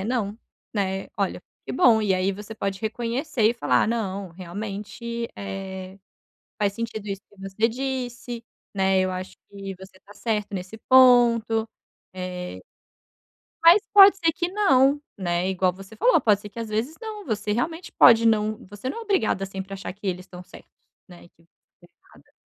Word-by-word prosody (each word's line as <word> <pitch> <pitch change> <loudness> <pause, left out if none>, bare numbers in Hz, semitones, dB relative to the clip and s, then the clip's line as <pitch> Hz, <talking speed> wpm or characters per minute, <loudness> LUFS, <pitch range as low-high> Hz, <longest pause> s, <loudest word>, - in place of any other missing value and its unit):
"É, - - -4
não", 220 -2 -2 0.4
né, 195 -2 -2
olha. 195 -3 -2 0.2
Que - - -5
bom 230 -3 +5
e 205 -2 +2
aí 185 +2 +1
você 210 +3 -9
pode 195 -2 -3
reconhecer 235 +4 -2
e - - -3
falar: 235 - +2
"Não, 200 -4 -2
realmente, 210 +6 -6
eh, 190 -1 -7 0.6
faz 205 -1 +1
sentido 220 -1 -5
isso 195 -1 -4
que 205 - -24
você 195 +4 0
disse, 245 -1 -4 0.3
né, 190 -1 +2
eu 185 0 +1
acho 185 0 -6
que 195 -1 -7
você 190 0 -14
está 205 +2 -17
certa 210 -2 -2
nesse 190 +4 -6
ponto.", 235 -3 +5 0.5
eh, 180 -1 -6 1.0
mas 340 +5 +7
pode 400 -1 +9
ser 330 -3 +2
que 345 - -1
não, 285 -9 +4 0.2
né. 175 -1 -1
Igual 185 -1 +1
você 195 +4 -13
falou, - - +4
pode 210 -3 +3
ser 210 - -9
que 205 - -19
as 225 -1 -5
vezes 225 +9 -2
não. 430 -2 -7
Você 215 -2 -2
realmente 325 - -2
pode 230 -1 +6
não 215 -1 +1
você 205 +6 -6
não 370 - -5
é - - -6
obrigada 390 - 0
sempre 195 0 -7
achar 195 - -6
que 200 +1 -8
eles 180 0 -3
estão 180 -2 -11
certos, 180 - -15 0.4
né, 175 -1 -15
que 165 - -29
você - - -29 0.6
tá - - -28
errada. - - -27
210 Hz, 175 wpm, -24 LUFS, 190-240 Hz, 1.0 s, pode